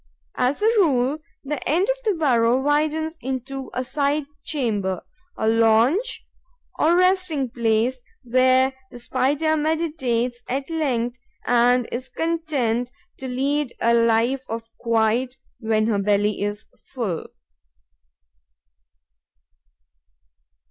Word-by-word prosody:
As 275 +10 +1
a 445 0 +4
rule, 280 -4 +2 0.2
the 290 0 -4
end 350 +7 +2
of - - +1
the 425 -4 +1
burrow 250 -6 +3
widens 310 +3 0
into 265 0 -4
a 255 - -2
side 280 +3 0 0.2
chamber, 205 - -1 0.3
a 220 - -1
lounge 230 - +3 0.5
or 330 +3 +4
resting 365 -8 +2
place 235 +2 0 0.2
where 255 +2 +3 0.2
the - - -11
Spider 275 +6 0
meditates 295 -7 -1
at 270 +4 -3
length 250 -6 -1 0.3
and 245 0 +3
is 255 +2 -4
content 285 -8 -1 0.3
to 265 - -5
lead 275 +1 -1
a 235 +1 +3
life 230 +3 +2
of 225 0 -6
quiet 230 +2 +1 0.2
when 220 -2 +1
her 215 -3 +1
belly 205 +1 +1
is 205 +1 -3 0.3
full. 205 -10 -3
255 Hz, 110 wpm, -23 LUFS, 230-300 Hz, 0.5 s, a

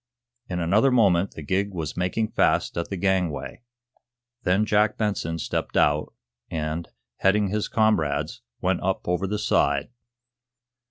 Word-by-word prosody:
In 90 -1 -2
another 100 +10 +3
moment 100 -7 +3
the 80 - -7
gig 95 +5 -1
was 80 -3 -4
making 90 +5 -1
fast - - +2
at 85 - -3
the 100 - -3
gangway. 90 -3 -1 0.8
Then 100 0 +2
Jack 105 0 +2
Benson 95 -6 -1
stepped - - -3
out, 75 +1 +2 0.4
and, 80 +1 -3 0.3
heading 100 +1 +2
his 105 +1 -1
comrades, 80 - +1 0.2
went 90 0 +1
up 95 +1 -2
over 90 +2 0
the 105 +2 -1
side. 70 -6 +1
95 Hz, 140 wpm, -25 LUFS, 85-105 Hz, 0.8 s, another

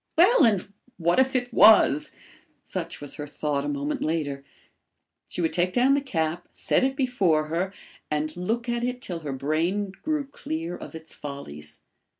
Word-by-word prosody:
Well, 385 +9 +6
and 210 -4 +2 0.3
what 170 +5 +2
if 265 +1 +3
it 245 -1 -1
was! 210 -11 +6 0.5
Such - - -5
was 145 - -6
her 150 -1 -5
thought 145 -1 -2
a - - -3
moment 145 +1 -2
later. 145 -3 -2 0.8
She - - -4
would 160 - 0
take 180 +1 +1
down 255 +3 +4
the 280 - +2
cap, 170 - -2
set - - +1
it 265 0 +1
before 190 - +1
her 175 +4 -1 0.4
and 150 +1 -1
look 225 +7 -2
at 240 0 -1
it 250 0 -2
till 175 -8 -5
her 150 -3 -5
brain 165 +9 -1
grew 305 -2 -1
clear 170 - -5
of - - -9
its 160 0 -10
follies. 75 - -8
175 Hz, 170 wpm, -26 LUFS, 150-245 Hz, 0.8 s, Well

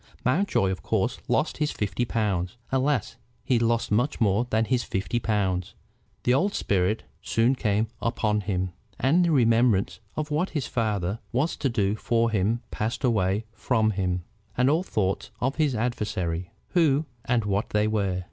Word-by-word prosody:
Mountjoy 130 - +2
of 95 - -4
course - - 0
lost - - +1
his 150 -1 +1
fifty 105 +3 -1
pounds. 105 -3 -1
Alas! 135 -3 0 0.3
he 125 -1 +2
lost 115 -1 +1
much 120 +8 +1
more 110 +1 +2
than 110 0 +2
his 125 0 +1
fifty 110 +3 -2
pounds. 95 -5 -1 0.5
The 125 - +3
old 195 +10 +2
spirit 100 +2 +1 0.2
soon 115 +3 +2
came 105 -4 +1 0.2
upon 105 -2 0
him, 95 -2 -2 0.3
and 155 +8 +4
the 170 - +2
remembrance 115 -6 +3 0.2
of 155 0 -3
what 160 +6 +1
his 140 - -1
father 105 -3 -1
was 140 +7 0
to 135 - 0
do 105 -4 +1
for 115 +1 +1
him 110 +4 +1
passed 115 +5 -3
away 105 -3 +1
from 110 -2 +1
him, 90 -3 -1 0.3
and 125 +2 +4
all 160 +3 +3
thoughts 100 - -1
of 130 +4 -1
his 150 -5 +2
adversaries, 105 -7 -2 0.2
who 160 -4 +3 0.2
and 120 -3 +1
what 100 0 0
they 105 0 +2
were. 100 -4 0
115 Hz, 165 wpm, -26 LUFS, 100-125 Hz, 0.5 s, and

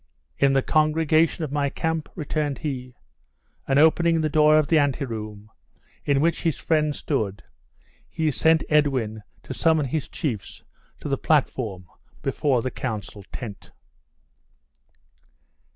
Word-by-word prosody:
"In 140 0 +4
the 135 -1 +2
congregation 155 +1 +2
of 150 - -4
my 145 -1 0
camp?" 160 +2 -2
returned 150 -3 -2
he; 125 -4 -5 0.7
and 135 - +2
opening 165 +2 +4
the 155 - 0
door 155 0 +5
of 155 -2 +2
the 160 - +4
ante 145 0 +1
room, 105 -3 -7 0.5
in 140 -1 +2
which 165 +1 +1
his 165 -4 0
friends 155 -2 0
stood, 105 -9 -2 0.7
he 160 -1 0
sent 160 +2 +3
Edwin 130 -8 +1 0.2
to - - -6
summon 160 -3 +2
his 140 +3 -2
chiefs 115 -10 -4 0.4
to - - -5
the 135 -2 -1
platform 120 - 0 0.4
before 130 -6 +1
the 130 - -2
council 105 -4 -5
tent. 110 -6 -8
145 Hz, 135 wpm, -24 LUFS, 125-155 Hz, 0.7 s, door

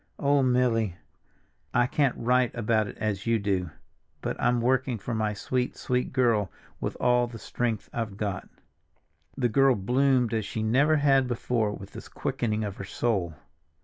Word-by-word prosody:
_ - - -39
Oh, 140 0 +3
Milly! 125 -6 +2 0.8
I 120 - +5
can't 140 -1 +1
write 125 +1 +2
about 110 -2 +1
it - - -9
as 105 -1 -2
you 115 0 +3
do, 95 -4 -1 0.5
but - - -2
I'm 120 0 +2
working 130 0 +1
for 115 +4 -5
my 110 -1 -1
sweet, 125 +4 -2
sweet 125 0 -1
girl 115 -7 +2 0.3
with - - -4
all 125 0 +3
the 120 -1 -9
strength 115 -1 -3
I've 110 -4 -3
got." 100 -3 -3 0.9
The 125 -3 +2
girl 135 +3 +4
bloomed 125 +3 +2
as 110 -1 0
she 110 +2 -4
never 140 +8 +3
had 135 -3 +3
before 115 -3 0
with 95 -1 -9
this - - -9
quickening 110 -2 -2
of 100 -2 -5
her - - -6
soul. 95 -5 -1
120 Hz, 170 wpm, -27 LUFS, 105-125 Hz, 0.9 s, I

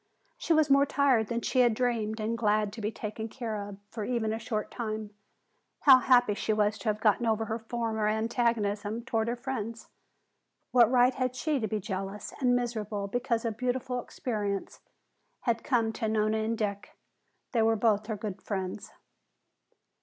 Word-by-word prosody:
She - - -4
was 310 -3 +4
more 275 +1 +5
tired 265 -7 +3
than 235 +1 -2
she 255 - 0
had 240 -3 +5
dreamed 225 -3 -1
and 220 +2 -1
glad 210 -2 +1
to 225 - -7
be 210 +1 -1
taken 220 +1 -5
care 230 -3 -4
of 200 - -9
for 220 - -4
even 220 -1 -1
a 225 - -3
short 215 -2 -2
a - - -24
time. 215 -3 -4 0.7
How 265 -3 +8
happy 245 -4 +4
she 215 +1 -1
was 210 0 +1
to 225 - -1
have 210 0 -1
gotten 220 +2 +2
over 225 0 +1
her 220 +1 -3
former 225 -1 -2
antagonism 220 -1 0
toward 225 -1 0
her 235 - 0
friends. 235 -3 -5 0.8
What 240 -3 +6
right 250 0 +4
had 255 -1 -1
she 290 +3 0
to 220 - -1
be 215 +1 -2
jealous 195 0 -5
and 250 -3 +3
miserable 215 -4 -2
because 240 0 -1
a 230 - +1
beautiful 250 +2 -2
experience 205 -6 -3 0.6
had 230 -2 0
come 230 -5 +1
to 220 0 -2
Nona 215 0 +1
and 225 +1 -1
Dick? 200 -2 -4 0.5
They 235 - +2
were 225 0 +4
both 215 -1 +2
her 220 -2 -3
good 205 -2 -5
friends. 190 -1 -4
225 Hz, 180 wpm, -29 LUFS, 215-245 Hz, 0.8 s, How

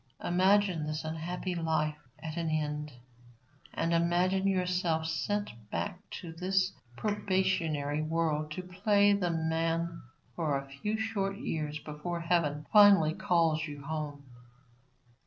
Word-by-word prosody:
Imagine 185 -2 +3
this 155 +1 -3
unhappy 170 +3 -3
life 160 -3 0 0.2
at 160 -1 -6
an 165 -1 -1
end, 150 -1 -2 0.8
and 165 +1 0
imagine 175 +3 +2
yourself 180 -4 +1
sent 205 +6 -1 0.2
back 195 - -3
to 170 -4 -7
this 185 +2 +1 0.3
probationary 185 - 0
world 155 -1 0
to 170 +4 -5
play 200 +3 +3
the 190 -3 +1
man 165 +1 -1 0.3
for 150 -4 0
a 135 0 -6
few 175 +11 -3
short 200 -3 -1
years 150 -4 -3
before 155 +3 -5
heaven 160 -4 +1
finally 200 -7 +7
calls 160 -2 +1
you 145 -1 -8
home. 150 -1 -4
165 Hz, 120 wpm, -31 LUFS, 155-185 Hz, 0.8 s, finally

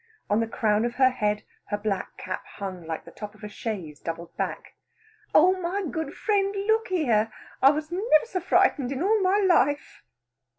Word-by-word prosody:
On 210 - +4
the 230 - 0
crown 215 -1 +1
of 240 0 -2
her 260 0 +5
head 210 -3 -1 0.2
her 205 - -2
black 205 -2 -3
cap 185 0 -5
hung, 185 -4 -6
like 160 -1 -4
the - - -12
top 210 0 -8
of 215 - -19
a - - -4
chaise 195 -8 -5
doubled 165 0 -6
back. - - -4 0.6
"Oh 365 +4 +7
my 370 +4 -1
good 320 -5 -4
friend, 400 -1 +1
look 445 +1 +2
here! 235 - +1 0.3
I 270 - +8
was 305 +2 -1
never 370 -2 +3
so 385 -5 -3
frightened 355 -7 +2
in 275 +4 -2
all 425 +2 +3
my 380 +2 +3
life." 330 -8 +2
265 Hz, 185 wpm, -26 LUFS, -, 0.6 s, I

